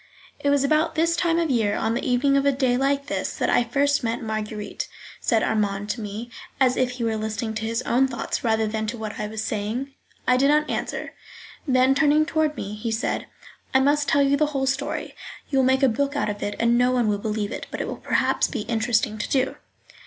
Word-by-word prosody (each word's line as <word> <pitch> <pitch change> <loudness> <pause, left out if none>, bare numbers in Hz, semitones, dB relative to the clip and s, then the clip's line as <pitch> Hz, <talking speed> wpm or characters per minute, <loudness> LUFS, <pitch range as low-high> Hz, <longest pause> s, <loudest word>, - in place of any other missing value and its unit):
"It 285 - 0
was 285 -1 +3
about 305 +3 +2
this 335 +1 +2
time 340 -1 +1
of 335 -2 +1
the - - +2
year, 215 -3 +1
on 225 - 0
the 240 - -2
evening 265 +2 +2
of 275 - +3
a 280 - +4
day 260 -2 +1
like 275 +2 +1
this, 290 - -3
that - - 0
I - - +4
first 280 +3 +1
met 230 0 -1
Marguerite," 215 -1 -4 0.3
said 225 -2 +1
Armand 205 -1 0
to 230 - -5
me, 215 +3 -6 0.3
as 255 -2 +4
if 255 -1 +1
he 245 -1 -4
were 225 -1 0
listening 220 +1 -3
to 220 0 -3
his 230 +2 -1
own 265 +3 +3
thoughts 240 -3 -4
rather 220 -2 +2
than 220 0 -2
to 235 +2 -4
what 215 -1 -6
I 210 - -2
was 220 +1 -4
saying. 225 +6 -3 0.3
I 250 - +5
did 275 +2 +4
not 300 +1 +3
answer. - - -3 0.5
Then 260 0 +4
turning 300 +2 +4
toward 310 -2 0
me, 200 - -5
he 215 +2 -4
said: 225 +3 -2 0.5
"I - - +7
must 285 +2 +2
tell 280 - +4
you 280 0 +3
the 305 +1 +2
whole 270 - +1
story; 270 +1 -2 0.4
you 270 - +3
will 260 - +4
make 265 +1 +3
a - - +7
book 280 +4 0
out 215 - 0
of 205 - -8
it; 205 - -3
no 245 +2 +4
one 245 -3 +2
will 205 -1 +1
believe 210 0 -2
it, - - -6
but - - -6
it - - -1
will - - -5
perhaps - - +1
be - - -4
interesting 220 -2 0
to - - -3
do." 265 -1 +1
245 Hz, 235 wpm, -24 LUFS, 220-280 Hz, 0.5 s, I